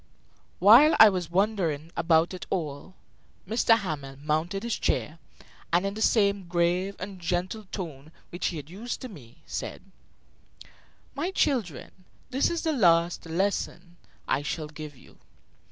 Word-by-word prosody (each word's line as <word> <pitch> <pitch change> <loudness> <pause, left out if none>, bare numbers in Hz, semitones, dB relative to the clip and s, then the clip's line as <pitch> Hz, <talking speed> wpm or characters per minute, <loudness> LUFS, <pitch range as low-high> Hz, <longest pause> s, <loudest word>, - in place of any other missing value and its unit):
While 235 - +7
I 220 - +10
was 180 -4 -3
wondering 175 -5 0
about 165 +1 +2
it 185 - -7
all, 160 +1 -4 0.5
M. 220 - -3
Hamel 160 - +1
mounted 155 +7 -2
his 235 -1 -2
chair, 160 +2 -1 0.5
and, 175 +3 +2
in 195 - -2
the 215 - -6
same 200 -4 +2
grave 175 +3 0
and 190 0 -7
gentle 180 +5 -2
tone 155 -6 -7 0.2
which 175 +1 -2
he 170 - -3
had 145 -1 -8
used 210 +9 -6
to 255 - -6
me, 130 - -15
said: - - -6 1.3
"My 310 +6 -2
children, 240 - -1 0.4
this 265 +2 +2
is 340 -1 -2
the 320 -2 +1
last 170 - +3
lesson 175 0 -2 0.3
I 135 - +1
shall 155 +2 -3
give 150 -1 -9
you. - - -19
180 Hz, 145 wpm, -27 LUFS, 160-205 Hz, 1.3 s, I